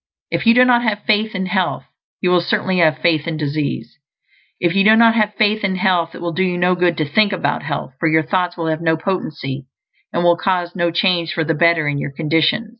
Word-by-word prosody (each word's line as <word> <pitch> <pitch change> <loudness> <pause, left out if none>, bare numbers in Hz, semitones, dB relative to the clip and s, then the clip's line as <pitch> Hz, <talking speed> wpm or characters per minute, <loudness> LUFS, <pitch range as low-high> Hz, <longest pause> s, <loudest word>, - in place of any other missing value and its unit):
If - - -2
you 230 - +6
do 250 0 +6
not 245 -1 +3
have 215 -3 -2
faith 215 -1 0
in 190 -1 -2
health, 185 -1 -2 0.4
you 180 - +1
will 180 -1 +3
certainly 185 +1 -1
have 155 -2 +3
faith 160 -2 +1
in 165 -2 -3
disease. 150 0 -4 0.6
If 175 -1 0
you 195 0 +3
do 215 +2 +6
not 230 0 +5
have 210 -2 0
faith 215 -1 +1
in 190 -2 0
health, 180 -3 0
it - - -10
will 170 -1 -3
do 185 - -2
you 180 -1 -1
no 180 +1 +2
good 175 -2 0
to 155 - 0
think 210 +7 +2
about 170 -7 -2
health, 145 -3 -5
for 165 - +1
your 160 0 +2
thoughts 180 +2 -2
will 165 - -3
have 160 0 -2
no 160 -1 +1
potency, 150 -7 -4 0.4
and 175 - -1
will 175 0 +4
cause 180 -1 -2
no 175 -1 0
change 170 -1 0
for 165 -4 -1
the 160 - -1
better 165 -1 +2
in 145 -1 -1
your - - -4
conditions. 165 +8 0
175 Hz, 240 wpm, -18 LUFS, 160-195 Hz, 0.6 s, you